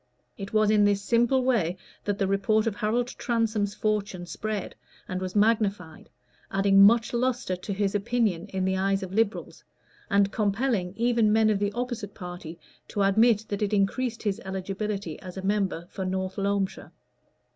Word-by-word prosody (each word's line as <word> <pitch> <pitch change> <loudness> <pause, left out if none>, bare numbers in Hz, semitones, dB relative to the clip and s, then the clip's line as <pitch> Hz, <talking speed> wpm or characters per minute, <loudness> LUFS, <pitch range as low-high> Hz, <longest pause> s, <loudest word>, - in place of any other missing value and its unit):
It 195 0 -7
was 215 -1 +3
in 210 -1 +4
this 205 -1 +3
simple 240 +5 +2
way 205 -9 +1 0.3
that 205 -1 -1
the 195 - +1
report 200 +3 +1
of 225 -3 -1
Harold 230 +2 0
Transome's 220 -4 0
fortune 200 -4 -2
spread 215 +2 -4 0.3
and 185 0 -4
was 185 +1 -4
magnified, 205 -6 +1 0.4
adding 195 0 +4
much 225 +4 +5
lustre 245 -5 0
to 180 +3 -6
his 200 0 0
opinion 205 -4 0
in 190 -2 -2
the 190 0 +1
eyes 195 +1 0
of 190 0 -7
Liberals, 220 0 -1 0.5
and 200 0 +3
compelling 205 -3 0
even 235 -2 +3
men 220 0 +4
of 205 - 0
the 205 0 0
opposite 240 -4 -4
party 175 -2 -8 0.3
to 200 - -1
admit 220 +2 +4
that 205 0 -3
it 210 0 0
increased 225 +4 0
his 210 +1 -1
eligibility 195 -2 -4
as 185 0 -9
a 190 - -5
member 195 -4 0
for 190 - -6
North 190 +1 -3
Loamshire. 200 -1 -1
205 Hz, 165 wpm, -26 LUFS, 190-220 Hz, 0.5 s, much